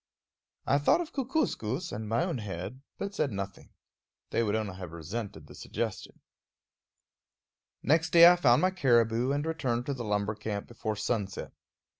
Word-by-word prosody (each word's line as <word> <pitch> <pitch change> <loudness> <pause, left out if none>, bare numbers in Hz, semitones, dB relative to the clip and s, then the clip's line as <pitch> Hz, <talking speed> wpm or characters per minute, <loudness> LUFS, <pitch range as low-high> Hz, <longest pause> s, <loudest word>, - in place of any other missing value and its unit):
I 140 - +3
thought 145 - +4
of 340 -3 -5
Kookooskoos 235 - -1
and 110 0 -5
my 115 +2 +2
own 125 - -2
head, 100 +4 -6 0.2
but 200 0 -4
said 155 -8 0
nothing. 100 -1 -6 0.6
They - - +2
would 105 -2 +1
only 110 -3 -2
have 90 -3 -8
resented 85 -1 -6
the - - -13
suggestion. - - -5 1.6
Next 160 +3 +3
day 170 +1 +9
I 175 - +8
found 130 -5 +4
my 185 - +4
caribou, 120 -6 +3
and 145 +2 0
returned 130 -7 -1
to 140 - -1
the 125 -3 -5
lumber 105 -1 0
camp 105 -1 -4
before 110 -2 -4
sunset. 105 -2 -2
120 Hz, 160 wpm, -29 LUFS, 105-150 Hz, 1.6 s, day